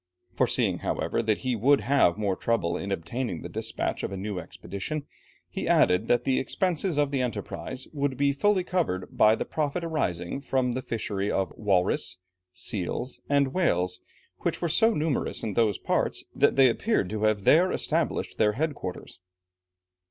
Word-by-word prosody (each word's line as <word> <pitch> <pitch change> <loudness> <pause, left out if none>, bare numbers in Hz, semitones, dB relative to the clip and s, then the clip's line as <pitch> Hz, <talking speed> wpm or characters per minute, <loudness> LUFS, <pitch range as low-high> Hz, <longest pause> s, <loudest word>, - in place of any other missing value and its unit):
Foreseeing, - - +1
however, - - -1
that 110 -1 0
he 125 -1 +1
would 135 +6 +4
have 135 -11 +3
more 100 -3 0
trouble 95 -8 0
in 100 +2 -4
obtaining 95 +1 -3
the - - -6
despatch - - -2
of - - -3
a 95 - -4
new 100 0 -3
expedition, 100 - -5 0.4
he - - -4
added 90 +5 +4
that 120 0 +3
the 130 0 +2
expenses 180 +2 0
of 145 -1 +2
the 135 -2 0
enterprise 125 +1 -4
would 140 -3 -1
be 140 +1 +2
fully 195 +6 +2
covered 165 - -2
by 110 +1 +6
the - - -3
profit 155 +3 -2
arising 135 - -2
from 130 -2 0
the 130 +2 -2
fishery 105 -4 -3
of 95 -1 -1
walrus, 95 -3 +1 0.3
seals, 105 +6 -3
and 140 -2 +2
whales, 90 - +1 0.4
which - - -1
were 175 - 0
so 225 +7 +4
numerous 150 -2 -1
in 110 - -2
those 105 -2 +2
parts, - - -1
that - - +3
they 135 -1 +7
appeared 125 - +1
to 110 -1 -3
have 105 -2 +1
there 175 - +5
established 160 0 -1
their 105 -1 +4
head 150 +6 -1
quarters. 95 -6 -7
125 Hz, 170 wpm, -27 LUFS, 100-145 Hz, 0.4 s, they